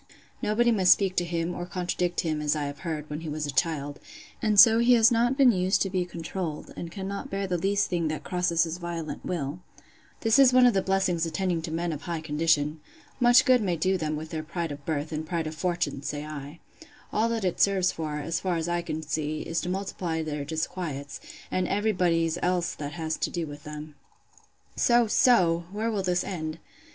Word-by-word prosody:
Nobody 235 +3 +2
must 190 -5 +6
speak 190 -2 -2
to 175 - +3
him 170 0 -2
or 175 0 -5
contradict 180 -1 -1
him, 155 -2 -2
as 150 0 +1
I 150 - -2
have 145 0 -5
heard, 155 -4 -4
when 150 0 -5
he 160 - -5
was 150 0 -3
a 145 - -3
child; 145 -3 -1 0.4
and 210 -2 +3
so 225 +2 +9
he 240 +1 +5
has 230 0 +6
not 240 +3 +2
been 270 -3 +7
used 185 -2 +1
to 195 - -4
be 185 -2 0
controlled, 170 -1 -5
and 170 - -6
cannot 195 +1 -5
bear 195 0 -2
the 180 -2 -1
least 200 +3 +1
thing 170 -2 0
that 155 0 -3
crosses 180 -2 +1
his 165 +1 -4
violent 170 -3 -5
will. 155 -2 -3 0.6
This 225 +3 +4
is 260 -2 +7
one 255 0 +7
of 245 - +5
the 195 - +2
blessings 190 -4 +1
attending 175 0 -1
men 170 +1 -1
of 150 - -6
high 170 +1 -3
condition! 155 0 +1 0.4
Much 245 +1 +6
good 255 -3 +5
may 185 -4 0
do 185 +4 +1
them 155 -4 -2
with 155 +1 -7
their 160 -2 -3
pride 165 0 -4
of 145 0 -8
birth, 155 -1 -2
and 155 0 -3
pride 165 +1 -2
of 155 - -4
fortune! 170 -4 -2
say 145 +1 -4
I:—All 155 +8 -5
that 225 -4 -1
it 180 - -1
serves 190 -2 +3
for, 150 -2 -4
as 165 +3 -2
far 185 -2 -1
as 165 0 -2
I 175 0 0
can 160 -2 -4
see, 155 0 -2
is, 165 - -2
to 180 - -4
multiply 180 -4 -3
their 150 -2 -3
disquiets, 155 -2 -4 0.3
and 185 -1 0
every 205 +2 +1
body's 170 -3 +1
else 180 -1 0
that 145 0 -6
has 160 -2 -3
to - - -1
do 170 -2 -3
with 145 -1 -10
them. 150 0 -8 0.8
So, 240 0 +4
so! 180 -7 +3
where 220 +3 -2
will 205 -3 -1
this 180 -1 0
end? 155 -4 -4
170 Hz, 215 wpm, -27 LUFS, 155-190 Hz, 0.8 s, so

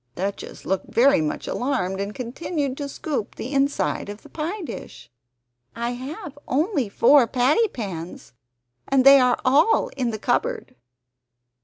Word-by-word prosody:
Duchess 195 +2 -5
looked 190 0 -2
very 255 - +4
much 150 -1 -3
alarmed, 200 -8 -1
and 200 +1 -5
continued 270 +2 -3
to 285 -1 -4
scoop 275 -6 -4
the 260 - -6
inside 275 -6 0
of 205 +1 -9
the - - -14
pie 345 +6 -4
dish. 120 - -9 0.6
"I 235 +1 -2
have 285 - -7
only 290 - 0
four 245 +5 +5
patty 270 - +3
pans, 180 - -7 0.5
and 270 -1 +3
they 275 0 +9
are 250 -1 +3
all 300 - +4
in 255 -3 -2
the 220 - -3
cupboard." 420 - -1
260 Hz, 145 wpm, -23 LUFS, 215-290 Hz, 0.6 s, they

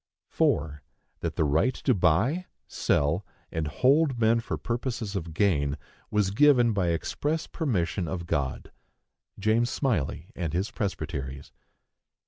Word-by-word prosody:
4. 75 -1 +1 0.4
That - - -3
the - - +2
right 80 - +2
to 130 - +1
buy, 110 - +2 0.2
sell, 75 +7 +1 0.3
and 80 -2 -2
hold 135 - +3
men 115 0 +3
for 115 - -4
purposes 120 -3 -3
of 85 -4 -3
gain, 80 -6 +1 0.3
was 105 -2 +1
given 120 -1 +5
by 95 -4 +1
express 145 - -1
permission 95 - -1
of 85 -1 -4
God. 70 -5 -2 0.7
(James 110 +4 +2
Smylie 100 - -1
and 85 -4 -3
his 95 +5 -1
Presbyteries.) 70 -8 -4
95 Hz, 125 wpm, -27 LUFS, 80-120 Hz, 0.7 s, given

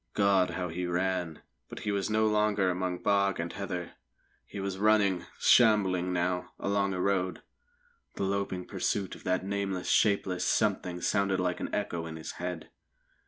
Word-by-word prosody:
God, 100 -3 +3
how 90 -2 -2
he 90 +2 -3
ran! 90 -2 -1 0.3
But - - -8
he 105 - -1
was 100 -1 -1
no 110 0 +2
longer 105 -3 +2
among 90 0 -3
bog 100 -2 +2
and 85 0 -3
heather. 90 -3 -4 0.6
He 100 - -7
was 95 -1 -3
running 100 -4 +3
shambling 95 -6 +4
now 90 0 -1
along 100 -1 0
a - - -3
road. 95 -1 0 0.7
The - - -3
loping 95 -2 -2
pursuit 100 -2 -2
of - - -11
that 90 0 0
nameless, 100 -2 -2
shapeless 95 -4 +2
Something 90 -3 0
sounded 100 0 +1
like 90 -1 -1
an - - -3
echo 85 -5 -2
in 80 - -7
his 80 0 -6
head. 90 -2 -5
95 Hz, 165 wpm, -29 LUFS, 90-100 Hz, 0.7 s, shambling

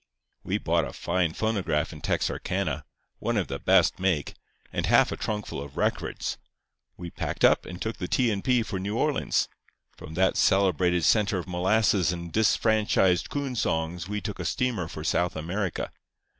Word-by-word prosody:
"We - - -1
bought - - +1
a - - -9
fine 90 -3 0
phonograph 95 -9 -1
in 75 - -10
Texarkana—one 80 -7 -2
of - - -1
the - - -4
best - - +3
make—and 90 -6 -3
half - - +5
a - - -2
trunkful 105 -9 -4
of 70 -1 -12
records. - - -1 0.6
We 85 -1 -7
packed - - 0
up, - - +4
and 90 -1 -7
took 110 +1 -3
the 90 - -4
T. 125 +2 +2
and 100 -2 -2
P. 125 -3 +3
for 95 -4 -4
New 100 +4 -3
Orleans. 150 +2 +1 0.5
From 80 - -10
that 95 +2 +2
celebrated 90 -3 +3
centre 105 +3 +3
of 90 - -5
molasses 95 0 +2
and 85 -1 -6
disfranchised 105 -5 +2
coon 140 -3 -3
songs 85 -3 -1
we 105 0 -2
took 105 -2 -5
a 90 - -4
steamer 115 - -1
for 80 -1 -7
South 85 +2 +1
America. 90 +4 -3
95 Hz, 165 wpm, -27 LUFS, 85-105 Hz, 0.6 s, half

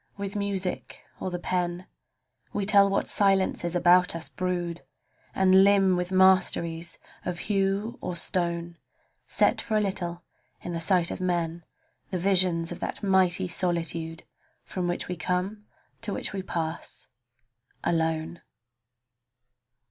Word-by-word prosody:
With 200 0 -5
music 200 -3 -3 0.2
or - - -3
the 180 - -3
pen 175 0 -2 0.7
We 200 - -1
tell 200 -1 +6
what 195 - 0
silences 190 -3 +1
about 180 0 +5
us 165 - -1
brood, 175 -2 -3 0.5
And 190 0 +6
limn 195 -2 +4
with 180 +1 -2
masteries 185 -3 +2 0.3
of 180 -1 -3
hue 195 +3 -1
or 180 - -4
stone, 170 -1 -2 0.5
Set - - +2
for 215 - -1
a - - +4
little 180 -4 -2 0.4
in 175 - -6
the 165 - -3
sight 175 -1 +3
of - - -5
men, 170 -2 -1 0.5
The 185 - -2
visions 180 -2 +2
of 175 - -6
that - - -4
mighty 190 -1 +3
solitude 165 -2 -2 0.4
From 180 -2 -3
which 175 - -2
we 180 - -3
come, 185 +4 -3 0.3
to 215 -3 -2
which - - -3
we 195 - -3
pass, 165 -3 -5 0.8
alone! 160 0 -1
180 Hz, 135 wpm, -27 LUFS, 170-195 Hz, 0.8 s, tell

